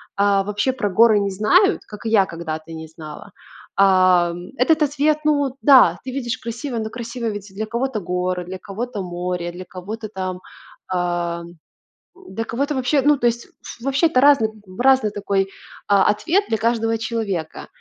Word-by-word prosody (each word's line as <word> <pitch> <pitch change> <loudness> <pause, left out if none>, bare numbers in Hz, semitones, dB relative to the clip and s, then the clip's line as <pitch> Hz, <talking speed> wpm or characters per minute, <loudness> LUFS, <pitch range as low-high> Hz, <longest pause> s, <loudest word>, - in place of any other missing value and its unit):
а, 200 -1 +3
вообще 205 +5 0
про 210 -5 -2
горы 215 +2 +5
не 200 -1 -1
знают, 360 - +3
как 210 +1 -11
и - - 0
я 210 -3 +4
когда-то 165 -2 -6
не 160 0 -7
знала. 155 +4 -11 0.4
А, 185 -3 +4
м, 175 +1 -9
этот 310 +5 +3
ответ, 295 +1 +1
ну 285 -3 +1
да, 275 -3 +6
ты 260 - -4
видишь 250 -2 -3
красиво, 235 +2 -5
но, 220 0 -3
красиво, 235 +1 -6
ведь, 205 -2 -5
для 215 +3 -3
кого-то- 235 +1 -2
горы, 180 -1 -2
для 185 +2 -6
кого-то- 215 +2 -5
море, 175 -1 -4
для 180 +1 -9
кого-то, 210 +5 -7
там, 185 -2 -4 0.5
а, 175 -2 -2 0.8
для 225 -8 -4
кого-то, 280 +7 -2
вообще, 265 +2 +1
ну, 295 +2 +5
то 240 - +2
есть, 235 0 -1
ф 235 - -13
вообще, 275 +5 +2
это 255 -5 +2
разный 280 -5 +5
м, 205 -4 -16
разный 260 -5 +4
такой, 200 -1 -1 0.4
а, 200 -1 +4
ответ 335 - +1
для 220 - +1
каждого 225 0 0
человека. 220 -8 -4
215 Hz, 175 wpm, -21 LUFS, 185-250 Hz, 0.8 s, да